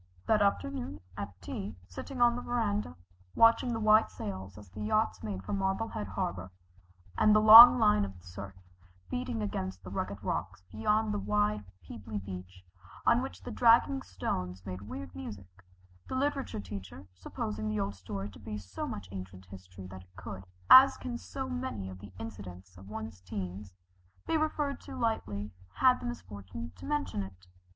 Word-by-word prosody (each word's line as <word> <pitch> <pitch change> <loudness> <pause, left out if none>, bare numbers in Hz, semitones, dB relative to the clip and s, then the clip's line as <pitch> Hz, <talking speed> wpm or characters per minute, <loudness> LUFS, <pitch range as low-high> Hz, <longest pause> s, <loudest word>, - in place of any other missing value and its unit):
That 215 -1 +3
afternoon 95 - -1 0.2
at 100 -2 -7
tea, 95 +3 -5
sitting 245 - -7
on 240 0 +5
the 245 - -4
verandah, 210 - -1 0.4
watching 230 +2 +5
the 225 - -2
white 215 0 +5
sails 95 -1 -7
as 105 -1 -12
the - - -8
yachts 215 +1 +1
made 100 -3 -5
for - - -4
Marblehead 195 - -1
harbor, 95 -1 -3 0.7
and 215 0 +6
the - - +7
long 230 +3 +12
line 210 - +4
of 100 -1 -4
surf 95 +2 -9 0.6
beating 115 -3 -2
against 95 -2 -4
the 90 - -9
rugged 100 +1 -4
rocks 90 - -3
beyond 210 - +1
the - - -1
wide 105 +1 0 0.2
pebbly 105 +1 -6
beach 90 -1 -8 0.4
on - - +5
which 90 +2 -7
the - - -6
dragging 245 +3 +4
stones 90 0 -4
made 95 -1 -6
weird 90 -3 -8
music, 95 +1 -9 0.4
the - - -4
literature 275 - -1
teacher, 95 -2 -8
supposing 105 +3 -4
the 105 0 -1
old 100 0 -1
story 95 +1 -6
to 90 - -14
be 105 -1 -6
so 95 -2 -6
much 100 -2 -6
ancient 95 -1 -8
history 95 0 -11
that 95 0 -9
it 90 0 -23
could, 95 0 -8 0.2
as 265 +1 +9
can 245 -2 -5
so 265 +2 -5
many 250 - -4
of 95 - -10
the 100 0 -11
incidents 95 -4 -9
of 95 +2 -13
one's 110 -3 -7
teens, 90 +1 -6 0.5
be - - 0
referred 300 -3 -1
to - - -9
lightly, 105 - -2 0.2
had 255 -1 +4
the 245 - -5
misfortune 100 - -7
to 90 0 -10
mention 95 0 -1
it. 95 -1 -9
100 Hz, 170 wpm, -31 LUFS, -, 0.7 s, long